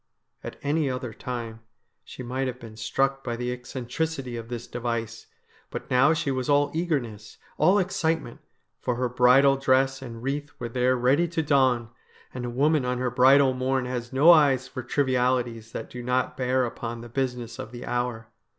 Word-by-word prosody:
At - - -7
any 145 0 +1
other 125 -2 -4
time 115 -1 -6 0.4
she - - -9
might 130 +2 -2
have 125 0 -5
been 115 -3 -11
struck 135 +5 -1
by 120 -2 -3
the 125 +1 -3
eccen 125 0 -8
tricity 135 -1 -3
of 115 -1 -7
this 120 -1 -5
device; 115 -2 -4 0.4
but - - -7
now 130 +4 +5
she 160 -3 0
was 130 0 -2
all 145 0 +3
eagerness, 125 - -3 0.2
all 190 +3 +5
excitement, 165 -8 -1 0.4
for 125 - -1
her 125 +1 0
bridal 125 +3 +5
dress 135 0 +2
and 115 -3 -8
wreath 145 +2 -2
were 120 - -5
there 125 +2 +2
ready 135 +8 +3
to 165 -1 -2
don, 130 -5 +2 0.4
and 125 -1 -5
a - - -3
woman 145 +4 +2
on 125 0 -1
her 125 0 -1
bridal 130 +2 +5
morn 130 0 0
has 125 -1 -4
no 145 +6 +7
eyes 140 -5 +4
for 130 - -6
trivialities 125 -3 0
that 115 - -7
do 125 - -7
not 125 +1 0
bear 130 0 +1
upon 115 0 -5
the 120 - -9
business 125 -1 -3
of 130 -3 -7
the 120 0 -8
hour. 120 -2 -2
125 Hz, 185 wpm, -26 LUFS, 120-135 Hz, 0.4 s, no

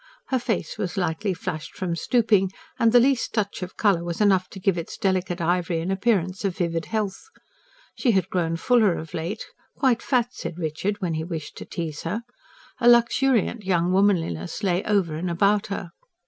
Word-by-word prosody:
Her 260 - +2
face 230 -2 -2
was 200 -1 -3
lightly 185 +2 0
flushed 165 -3 -5
from 175 -2 -2
stooping 210 -1 +2 0.3
and 230 -1 +4
the 245 - +7
least 255 -2 +2
touch 205 -3 -1
of 180 0 -7
colour 195 -6 +3
was 170 -1 -4
enough 190 -3 +3
to 195 - -9
give 190 -1 +2
its 170 -1 -5
delicate 185 -2 0
ivory 170 0 0
an 170 +4 -2
appearance 195 -2 0
of 195 -3 -1
vivid 170 -3 -1
health. 215 - -3 0.6
She 255 - 0
had 190 -5 +3
grown 165 -2 0
fuller 215 -1 +3
of 160 0 -8
late 170 +7 -4 0.3
quite 255 -5 +2
fat, 245 -2 +1
said 170 - -6
Richard, 180 +5 -2
when 175 -3 -1
he 160 0 -2
wished 160 -3 -6
to - - -7
tease 160 -4 -5
her: 205 +8 -3 0.6
a 240 - +5
luxuriant 240 -1 +3
young 180 -2 +1
womanliness 180 - +1
lay 180 -1 +1
over 195 -6 +1
and 170 +4 -3
about 200 +4 +2
her. 195 -3 -5
190 Hz, 185 wpm, -24 LUFS, 170-215 Hz, 0.6 s, the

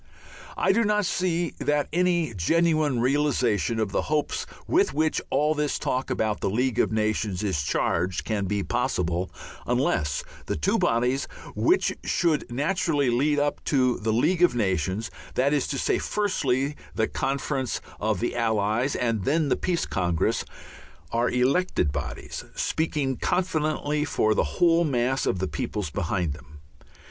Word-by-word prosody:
I - - +3
do 230 +4 +3
not 210 -1 +2
see 175 -2 0
that 145 -1 +1
any 175 -6 +1
genuine 155 - +2
realization 125 -5 +1
of 110 -3 -1
the - - +1
hopes 150 -1 -1 0.2
with 390 +3 +2
which 155 0 +1
all 150 +3 +2
this 150 -1 -1
talk 130 +1 -2
about 110 -1 0
the - - 0
League 125 +4 0
of - - +2
Nations 110 -3 0
is 95 -8 0
charged 85 +5 0
can 105 -3 -1
be 100 +1 -1
possible, 90 -8 -1 0.4
unless 75 -2 +1 0.2
the - - -1
two 75 - +1
bodies 125 +4 +1 0.3
which 365 +3 +2
should 165 -7 0
naturally 145 0 +1
lead 145 +5 +2
up 145 0 0
to 130 -3 +2
the 110 +1 -1
League 160 +11 +2
of 175 -8 +5
Nations 95 -1 -1 0.2
that 140 +3 +2
is 145 -3 +1
to 140 - -2
say, - - +1
firstly, 145 -9 0 0.2
the 110 -1 +1
Conference 135 -1 -2 0.2
of 110 0 0
the 120 - -1
Allies, 115 +2 +1
and 115 -4 0
then 150 - +1
the - - +3
Peace 180 -2 -1
Congress 85 -3 0 0.7
are 120 +1 +1
elected 130 - +1
bodies, 75 -1 -5
speaking 145 -5 -1
confidently 155 -4 0
for 110 -7 +1
the - - +2
whole 170 -1 +4
mass 130 -3 0
of - - +1
the 95 +1 -1
peoples 75 0 -3
behind 85 -2 -1
them. 75 0 -14
130 Hz, 155 wpm, -26 LUFS, 105-155 Hz, 0.7 s, of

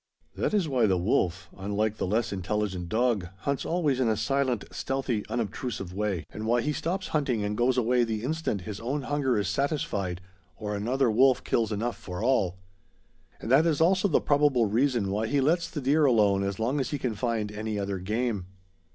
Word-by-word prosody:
That - - 0
is 195 -6 +2
why 125 -6 +2
the 95 -2 +2
wolf, 90 0 0
unlike 105 +2 -1
the - - -2
less 110 +2 0
intelligent 95 -2 -2
dog, 110 -4 +1
hunts 140 +2 -2
always 155 -6 +1
in 130 - +2
a 110 -1 +1
silent, 125 0 0
stealthy, 130 -5 -2
unobtrusive 110 -4 -3
way; 100 -4 -2
and 110 +1 -5
why 120 +1 +3
he 150 +5 -1
stops 185 +7 -3
hunting 135 -8 0
and 105 +1 -1
goes 125 +3 +2
away 125 0 +3
the 110 -2 -2
instant 150 - -2
his 105 +2 -6
own 135 +5 -2
hunger 135 -3 0
is 100 -2 0
satisfied 100 - -1 0.4
or 105 -1 -4
another 120 +4 +1
wolf 130 +3 +4
kills 115 -2 0
enough 115 +3 -2
for 90 +2 -6
all. 100 -8 +2 0.8
And 110 - -5
that 150 +5 +6
is 155 -4 +1
also 190 +4 +4
the 165 - +3
probable 145 -5 +3
reason 115 -1 +1
why 105 +3 0
he 145 +4 +1
lets 170 +5 +2
the 160 - -4
deer 145 +4 +3
alone 105 -6 +4
as 100 -1 -2
long 125 +6 0
as 135 - -1
he 145 - -2
can 125 -4 -2
find 110 -2 -2
any 105 0 -3
other 100 -1 -2
game. 105 0 -2
115 Hz, 195 wpm, -27 LUFS, 105-135 Hz, 0.8 s, that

